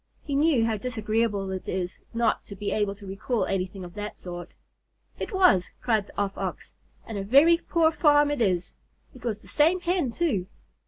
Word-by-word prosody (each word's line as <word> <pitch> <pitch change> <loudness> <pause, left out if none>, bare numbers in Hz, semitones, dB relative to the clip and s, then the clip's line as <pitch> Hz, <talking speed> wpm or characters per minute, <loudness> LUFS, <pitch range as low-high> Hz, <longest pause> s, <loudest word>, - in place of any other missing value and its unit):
He 285 - -4
knew 280 -5 +3
how 225 -1 0
disagreeable 215 -3 -1
it 190 -1 -5
is 180 -1 -3
not 230 -1 +1
to 200 - -8
be 205 +1 -3
able 205 -2 0
to 200 0 -13
recall 195 +5 -1
anything 185 0 -3
of 175 -1 -9
that 210 0 -6
sort. 175 -1 -8 0.6
"It - - -4
was," 365 - +4
cried 220 -4 +1
the - - -17
Off 200 -1 -1
Ox; - - -5 0.3
"and 220 -3 -5
a - - -3
very 285 +11 +6
poor 330 -2 +2
farm 295 -2 +4
it 290 -4 -2
is. 185 -5 +1 0.4
It 255 -4 -15
was 225 -4 -1
the - - -19
same 325 +5 +3
Hen 355 -5 0
too. 230 - 0
220 Hz, 195 wpm, -26 LUFS, 195-290 Hz, 0.6 s, very